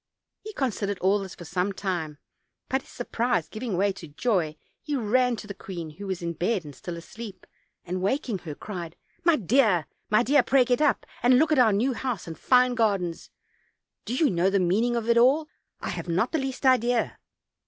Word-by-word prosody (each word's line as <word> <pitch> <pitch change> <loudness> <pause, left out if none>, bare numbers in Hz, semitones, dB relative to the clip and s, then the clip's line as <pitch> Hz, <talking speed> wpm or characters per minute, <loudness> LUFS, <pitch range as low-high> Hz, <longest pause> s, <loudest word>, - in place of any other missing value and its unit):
He 430 - -7
considered 205 - -1
all 195 +3 +2
this 195 -2 -7
for 175 - -10
some 180 +4 -1
time: 175 -6 -3 0.5
but, 265 +1 +1
his - - -20
surprise 235 -8 -1
giving 215 0 -4
way 200 +2 +3
to 185 -3 -10
joy, 160 -1 0 0.3
he 295 -1 -3
ran 250 +1 +2
to 215 - -8
the 205 - -6
queen, 175 -5 -7
who 200 +6 -9
was 185 -2 -3
in 170 0 -2
bed 180 +2 -1
and 145 - -9
still 170 +6 -7
asleep, 195 +2 -9 0.4
and 180 +1 -3
waking 215 0 -1
her, 155 -4 -7
cried: 175 -4 -7 0.3
"My 340 -1 +5
dear, 215 - +3 0.2
my 215 +2 +4
dear, 280 +2 +5
pray 255 +1 +3
get 245 +4 +1
up, 295 - +2 0.2
and 250 +1 +5
look 310 +3 +3
at 305 - +4
our 235 -3 +6
new 235 +7 +1
house 245 -4 -3
and 165 - -7
fine 250 - +4
gardens. 200 -8 0 0.8
Do 235 - -2
you 295 -1 +3
know 175 +1 +2
the 200 0 +2
meaning 210 +7 +2
of 230 -1 -2
it 235 0 +5
all? 280 +6 +4 0.3
I - - -3
have - - -5
not 180 +8 +1
the 320 - +1
least 270 0 -4
idea." 245 -2 +2
215 Hz, 205 wpm, -26 LUFS, 180-250 Hz, 0.8 s, our